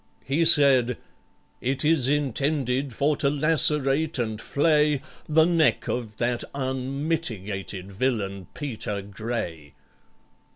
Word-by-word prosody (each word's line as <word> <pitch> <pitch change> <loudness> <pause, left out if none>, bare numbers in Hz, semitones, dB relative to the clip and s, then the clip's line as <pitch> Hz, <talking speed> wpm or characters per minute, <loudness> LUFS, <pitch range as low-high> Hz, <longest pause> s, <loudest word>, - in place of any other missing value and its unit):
He 150 +5 +1
said, 135 -6 +5 0.6
"It 135 +4 -1
is 150 -5 +2
intended 140 -1 0
for 140 +6 +1
to 140 - +1
lacerate 150 0 +3
and 110 -3 -3
flay 150 -1 +1 0.3
The 160 +1 +5
neck 165 -3 +2
of 110 -3 -4
that 120 0 -1
unmitigated 130 - -3
villain 100 -4 -2
PETER 110 -8 -5
GRAY!" 100 - -6
130 Hz, 100 wpm, -25 LUFS, 110-150 Hz, 0.6 s, said